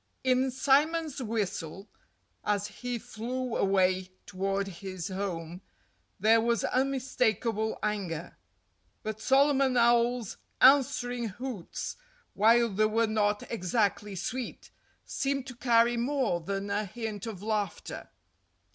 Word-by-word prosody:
In 260 Hz, 0 st, +3 dB
Simon's 290 Hz, +3 st, +2 dB
whistle, 200 Hz, -5 st, -3 dB, 0.6 s
as 205 Hz, -1 st, 0 dB
he 245 Hz, +4 st, -4 dB
flew 240 Hz, +3 st, -4 dB
away 185 Hz, -1 st, +2 dB, 0.2 s
toward 195 Hz, +1 st, -1 dB
his 185 Hz, -1 st, -6 dB
home, 180 Hz, -3 st, -4 dB, 0.6 s
there 220 Hz, +3 st, +5 dB
was 235 Hz, 0 st, +1 dB
unmistakable 245 Hz, -5 st, 0 dB
anger. 185 Hz, -6 st, -3 dB, 0.7 s
But 215 Hz, 0 st, -4 dB
Solomon 275 Hz, -1 st, +3 dB
Owl's 235 Hz, -1 st, +3 dB, 0.2 s
answering 250 Hz, -3 st, +4 dB
hoots—while 240 Hz, -, -1 dB
they 215 Hz, +1 st, +2 dB
were 225 Hz, +2 st, +2 dB
not 210 Hz, -1 st, +1 dB
exactly 205 Hz, -1 st, 0 dB
sweet—seemed 260 Hz, +5 st, -4 dB
to 255 Hz, -2 st, -8 dB
carry 235 Hz, -1 st, +3 dB
more 245 Hz, -7 st, 0 dB
than 195 Hz, +3 st, -3 dB
a 210 Hz, +1 st, 0 dB
hint 215 Hz, 0 st, -5 dB
of 205 Hz, -4 st, -7 dB
laughter. 210 Hz, -2 st, -3 dB
225 Hz, 100 wpm, -29 LUFS, 200-250 Hz, 0.7 s, there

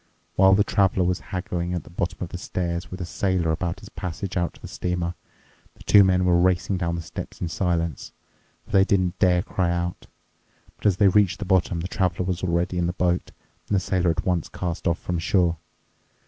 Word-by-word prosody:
While 95 Hz, 0 st, +6 dB
the 100 Hz, -, +4 dB
Traveler 95 Hz, -3 st, +2 dB
was 90 Hz, +1 st, 0 dB
haggling 90 Hz, -1 st, -2 dB
at 85 Hz, -, -3 dB
the -, -, -15 dB
bottom 85 Hz, 0 st, -2 dB
of 85 Hz, -, -5 dB
the 90 Hz, -, -6 dB
stairs 85 Hz, -1 st, -3 dB
with 95 Hz, 0 st, -7 dB
a -, -, -2 dB
sailor 90 Hz, -2 st, 0 dB
about 85 Hz, +2 st, -2 dB
his -, -, -11 dB
passage 90 Hz, +2 st, -5 dB
out 85 Hz, -2 st, -1 dB
to -, -, -17 dB
the -, -, -8 dB
steamer, 90 Hz, -1 st, -2 dB, 0.6 s
the -, -, -16 dB
two 100 Hz, -, +7 dB
men 90 Hz, -1 st, +3 dB
were 85 Hz, -1 st, +4 dB
racing 95 Hz, +1 st, +2 dB
down 85 Hz, -1 st, -1 dB
the 85 Hz, -, -4 dB
steps -, -, -8 dB
in 85 Hz, -, -2 dB
silence, 85 Hz, -4 st, -1 dB, 0.5 s
for -, -, -15 dB
they 95 Hz, -, +6 dB
didn't 95 Hz, -2 st, +1 dB
dare 90 Hz, -2 st, +3 dB
cry 90 Hz, -2 st, -1 dB
out. 85 Hz, 0 st, -3 dB, 0.7 s
But -, -, -1 dB
as 95 Hz, -3 st, +3 dB
they 100 Hz, -, +5 dB
reached 100 Hz, -1 st, +3 dB
the 105 Hz, -, -5 dB
bottom, 90 Hz, -3 st, +1 dB
the 90 Hz, -, -3 dB
Traveler 90 Hz, -2 st, 0 dB
was 90 Hz, -1 st, -2 dB
already 90 Hz, 0 st, 0 dB
in 85 Hz, -, +1 dB
the 90 Hz, -, -2 dB
boat, 90 Hz, -1 st, 0 dB, 0.4 s
and 105 Hz, -, +2 dB
the -, -, +4 dB
sailor 95 Hz, -2 st, 0 dB
at 80 Hz, -, -1 dB
once 90 Hz, -3 st, 0 dB
cast 90 Hz, 0 st, -4 dB
off 85 Hz, 0 st, +2 dB
from 90 Hz, -2 st, -3 dB
shore. 85 Hz, 0 st, +2 dB
90 Hz, 220 wpm, -24 LUFS, 85-95 Hz, 0.7 s, two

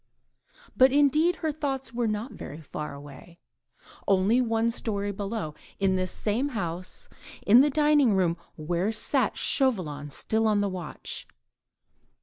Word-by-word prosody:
But 260 Hz, 0 st, +6 dB
indeed 300 Hz, +5 st, +4 dB
her 315 Hz, -, +2 dB
thoughts 270 Hz, -5 st, -3 dB
were 235 Hz, -1 st, 0 dB
not 215 Hz, +4 st, -3 dB
very 150 Hz, -, -8 dB
far 150 Hz, -1 st, -6 dB
away: 145 Hz, +4 st, -12 dB, 0.7 s
only 200 Hz, +5 st, +3 dB
one 230 Hz, -1 st, +1 dB
storey 205 Hz, -3 st, -2 dB
below, 200 Hz, -4 st, -4 dB, 0.3 s
in 195 Hz, -1 st, +2 dB
this 185 Hz, 0 st, -1 dB
same 235 Hz, +7 st, -1 dB
house, 175 Hz, -2 st, -5 dB, 0.4 s
in 230 Hz, +5 st, +8 dB
the 295 Hz, -, +4 dB
dining 295 Hz, -6 st, +4 dB
room 175 Hz, -3 st, +2 dB, 0.2 s
where 175 Hz, +6 st, -1 dB
sat 230 Hz, +2 st, 0 dB
Chauvelin 175 Hz, -, 0 dB
still 220 Hz, +10 st, 0 dB
on 210 Hz, -1 st, +3 dB
the 205 Hz, 0 st, +1 dB
watch. 180 Hz, -6 st, -6 dB
210 Hz, 135 wpm, -27 LUFS, 180-255 Hz, 0.7 s, in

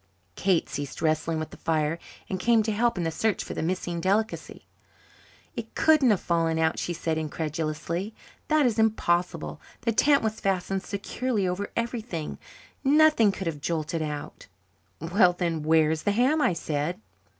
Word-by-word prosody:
Kate 185 Hz, -3 st, +2 dB
ceased 145 Hz, -1 st, -5 dB
wrestling 160 Hz, 0 st, +1 dB
with 155 Hz, 0 st, -4 dB
the -, -, -11 dB
fire 160 Hz, 0 st, 0 dB, 0.3 s
and 185 Hz, -, -3 dB
came 230 Hz, +2 st, +4 dB
to 220 Hz, -, -1 dB
help 230 Hz, +1 st, +1 dB
in 175 Hz, -, -1 dB
the 165 Hz, -, -1 dB
search 210 Hz, +5 st, 0 dB
for -, -, -6 dB
the -, -, -3 dB
missing 175 Hz, 0 st, -2 dB
delicacy. 205 Hz, +5 st, -1 dB, 0.9 s
"It -, -, -7 dB
couldn't 310 Hz, -5 st, +5 dB
have 205 Hz, -4 st, +3 dB
fallen 165 Hz, -1 st, 0 dB
out," 160 Hz, 0 st, +1 dB
she -, -, -2 dB
said 160 Hz, -1 st, -1 dB
incredulously. 160 Hz, +5 st, -3 dB, 0.3 s
"That 305 Hz, -2 st, +3 dB
is 230 Hz, -2 st, +1 dB
impossible. 180 Hz, -6 st, 0 dB, 0.2 s
The 230 Hz, -, +1 dB
tent 280 Hz, +5 st, +4 dB
was 220 Hz, 0 st, -1 dB
fastened 195 Hz, 0 st, -1 dB
securely 205 Hz, +1 st, -2 dB
over 180 Hz, +3 st, -2 dB
everything. 230 Hz, -9 st, -3 dB, 0.4 s
Nothing 295 Hz, -6 st, +5 dB
could 195 Hz, -1 st, -6 dB
have 155 Hz, -4 st, -3 dB
jolted 160 Hz, 0 st, -2 dB
out." 150 Hz, -1 st, -5 dB, 0.5 s
"Well, 175 Hz, +3 st, +3 dB
then, 170 Hz, -3 st, -1 dB
where 155 Hz, 0 st, +4 dB
is 160 Hz, -1 st, -1 dB
the 205 Hz, -, +1 dB
ham?" 260 Hz, +8 st, +3 dB
I 185 Hz, -, +3 dB
said. 155 Hz, 0 st, -2 dB
180 Hz, 165 wpm, -27 LUFS, 160-220 Hz, 0.9 s, couldn't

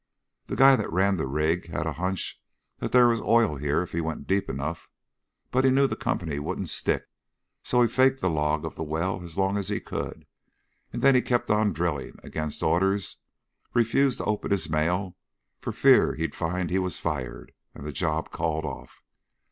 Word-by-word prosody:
The -, -, -3 dB
guy 135 Hz, 0 st, +7 dB
that -, -, -3 dB
ran 95 Hz, +3 st, +2 dB
the 80 Hz, -, -2 dB
rig 80 Hz, +5 st, 0 dB
had 80 Hz, -, -3 dB
a 80 Hz, -, -2 dB
hunch 90 Hz, +4 st, -3 dB, 0.4 s
there 125 Hz, -1 st, +4 dB
was 115 Hz, -1 st, +1 dB
oil 115 Hz, -10 st, +3 dB
here 75 Hz, +4 st, 0 dB
if 90 Hz, -, -10 dB
he 85 Hz, -, -1 dB
went 80 Hz, -1 st, -4 dB
deep 100 Hz, +1 st, 0 dB
enough, 75 Hz, +5 st, -4 dB, 0.6 s
but 130 Hz, +1 st, +2 dB
he 135 Hz, -, +5 dB
knew 135 Hz, +1 st, +4 dB
the -, -, -1 dB
company 80 Hz, -5 st, -2 dB
wouldn't 70 Hz, -, -3 dB
stick, -, -, 0 dB, 0.6 s
so 125 Hz, 0 st, +3 dB
he -, -, +4 dB
faked 130 Hz, +3 st, +3 dB
the -, -, 0 dB
log 75 Hz, -1 st, 0 dB
of 80 Hz, -, -5 dB
the -, -, -8 dB
well 80 Hz, +5 st, -2 dB
as 85 Hz, -2 st, -10 dB
long 95 Hz, +1 st, +1 dB
as 100 Hz, -, -3 dB
he -, -, -1 dB
could, -, -, -6 dB, 0.6 s
then 135 Hz, -, +3 dB
he 125 Hz, -, +5 dB
kept 120 Hz, -3 st, 0 dB
on 105 Hz, 0 st, +3 dB
drilling, 80 Hz, -4 st, -2 dB
against 75 Hz, -1 st, -4 dB
orders 95 Hz, +2 st, +1 dB, 0.6 s
refused 120 Hz, +3 st, +3 dB
to -, -, -4 dB
open 105 Hz, 0 st, -1 dB
his 90 Hz, -6 st, 0 dB
mail, 90 Hz, +4 st, 0 dB, 0.4 s
for -, -, -4 dB
fear -, -, +5 dB
he'd 80 Hz, -2 st, -3 dB
find 90 Hz, +1 st, -2 dB
he 95 Hz, -, +2 dB
was 90 Hz, -1 st, -2 dB
fired 70 Hz, -7 st, -4 dB, 0.2 s
and 70 Hz, -, -9 dB
the 75 Hz, -, -4 dB
job -, -, -2 dB
called 80 Hz, -1 st, -1 dB
off. -, -, -8 dB
90 Hz, 190 wpm, -26 LUFS, 80-105 Hz, 0.6 s, guy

